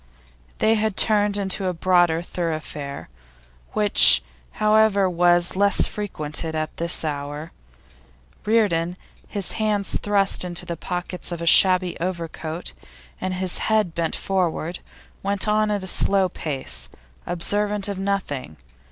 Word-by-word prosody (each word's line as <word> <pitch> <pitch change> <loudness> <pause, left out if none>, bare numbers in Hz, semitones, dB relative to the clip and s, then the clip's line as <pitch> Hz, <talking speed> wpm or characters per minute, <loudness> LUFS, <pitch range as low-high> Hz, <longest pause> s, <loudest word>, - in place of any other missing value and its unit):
They 220 - +2
had 215 -2 -1
turned 205 -2 +3
into 195 -1 -1
a 180 - -2
broader 175 -1 +2
thoroughfare, 155 - -5 0.7
which, 210 -1 +6 0.3
however, 215 -2 +3
was 175 0 +2
little 200 +1 +3
frequented 160 -5 -4
at 155 0 -4
this 170 -1 0
hour. 145 +2 -5 0.9
Reardon, 185 -6 +1 0.3
his 200 -3 0
hands 210 -2 0
thrust 200 -2 +2
into 175 0 -2
the 170 -1 -4
pockets 180 +2 -4
of 170 - -4
a 170 - -4
shabby 185 +1 +4
overcoat 170 -1 -5 0.5
and 185 0 -3
his 185 -1 +2
head 215 -6 +1
bent 165 -1 -2
forward, 175 -2 -2 0.4
went 200 +1 -1
on 215 0 +2
at 205 -2 -2
a - - -6
slow 195 +1 +3
pace, 60 - 0 0.4
observant 205 +4 -1
of 200 -2 -5
nothing. 185 - -3
180 Hz, 125 wpm, -22 LUFS, 165-200 Hz, 0.9 s, which